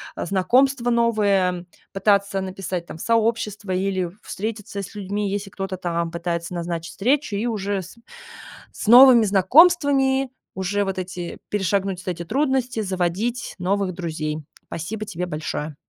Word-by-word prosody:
э, - - -4
знакомства 240 +8 +2
новые, 220 -4 +3
м, 180 -1 -6 0.2
пытаться 200 0 +2
написать 185 -2 -4
там 160 - -9
сообщество 215 -2 0
или 185 -1 0
встретиться 210 -1 -5
с 200 - -9
людьми, 205 0 -2
если 200 0 -3
кто-то 195 -1 -4
там 170 -2 -2
пытается 170 0 -3
назначить 170 -1 -4
встречу, 250 0 0
и 210 - -1
уже 205 -3 -2
с 185 - -12 0.8
с - - -7
новыми 245 -1 +9
знакомствами 270 - +4 0.3
уже 195 +2 0
вот 195 -1 -3
эти 180 -1 -6
перешагнуть 195 -1 -1
эти 170 -1 -3
трудности 260 - 0
заводить 190 +5 -2
новых 195 +1 0
друзей. 155 -3 -4 0.3
Спасибо 215 +7 -5
тебе 180 -4 -4
большое. 150 -1 -4
195 Hz, 135 wpm, -22 LUFS, 180-225 Hz, 0.8 s, новыми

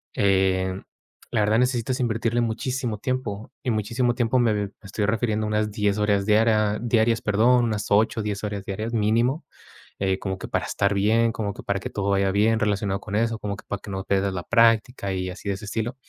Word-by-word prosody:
eh, 95 -1 +2 0.5
la 115 - +1
verdad 110 +2 +3
necesitas 125 0 0
invertirle 115 0 0
muchísimo 120 0 -2
tiempo 115 -4 -3
y - - -1
muchísimo 115 +3 0
tiempo. 120 +1 +1
Me 120 -2 +3
me 100 -1 -2
estoy 100 +1 -2
refiriendo 110 0 0
a - - -2
unas 105 0 0
10 105 -1 0
horas 100 -1 +2
diarias 110 0 +3
diarias, 115 -1 +2
perdón, 120 +4 +3
unas 105 -3 -2
8 110 +2 +2
o - - -4
10 105 -1 -3
horas 100 -2 -4
diarias 110 +4 -4
mínimo, 115 +6 +1 0.5
eh, 95 -1 0
como 95 -1 -3
que - - -7
para - - -1
estar 100 0 0
bien, 110 +3 +2
como 105 -3 -3
que - - -10
para 100 -1 -2
que - - -5
todo 100 -1 -2
vaya 100 0 +2
bien 110 +2 +2
relacionado 100 -2 0
con 100 -1 -4
eso, 115 0 0
como 100 -2 -4
que - - -13
para 100 - -4
que 105 - -10
no 95 -1 -4
pierdas 100 -1 0
la 90 - -3
práctica 115 -2 +2
y 90 0 -2
así 95 +2 -8
de 100 - +1
ese 100 - -10
estilo. 115 +4 -3
105 Hz, 215 wpm, -24 LUFS, 100-115 Hz, 0.5 s, verdad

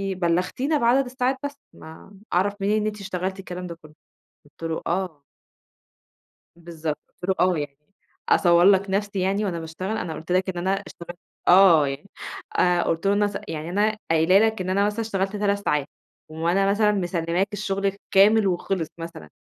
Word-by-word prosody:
بلّغتينا 185 - 0
بعدد 255 +2 +3
الساعات 255 +1 -1
بس، 285 0 -4 0.2
ما 160 +5 -13 0.2
أعرف 195 +3 +2
منين 210 +2 +2
إن - - -2
أنتِ 210 -1 -5
اشتغلتِ 190 0 -4
الكلام 180 -1 -6
ده 170 - -7
كلّه؟"، 155 0 -16 0.5
قُلت 150 +3 -17
له 160 - -2
"آه". 170 -5 -2 1.3
بالضبط. 165 -3 -5 0.2
قُلت 180 - -5
له: 190 - +3
"آه 180 - +1
يعني 145 -1 -5 0.5
أصور 175 -1 +5
لك 195 0 +4
نَفسي 200 0 -1
يعني 195 +3 0
وأنا 170 -4 -2
باشتغل، 185 +7 -4
أنا 165 -6 -4
قُلت 160 +3 -5
لك 185 +1 +1
إن 175 -2 -3
أنا 185 +2 -1 0.2
اشتغلت" 175 +1 -10 0.3
آه 175 -6 +7
يعني 140 +9 -7 0.5
آآ، 175 -1 +3
قُلت 165 +4 -1
له 200 - +4
إن 205 +1 +2
أنا 205 0 +1
س - - -5
يعني 160 +2 -5
أنا 210 +3 +1
قايلة 165 +4 +5
لك 220 -2 +2
إن 185 0 -2
أنا 200 +2 +2
مثلًا 210 +2 -2
اشتغلت 195 -2 -2
3 200 0 +1
ساعات، 145 -1 0 0.4
وأنا 170 +5 +1
مثلًا 210 0 +3
مسلّماك 175 0 -1
الشغل 195 -1 -2
كامل 205 +2 +5
وخلص 180 -2 -1
مثلًا، 165 -1 -8
190 Hz, 180 wpm, -24 LUFS, 170-205 Hz, 1.3 s, آه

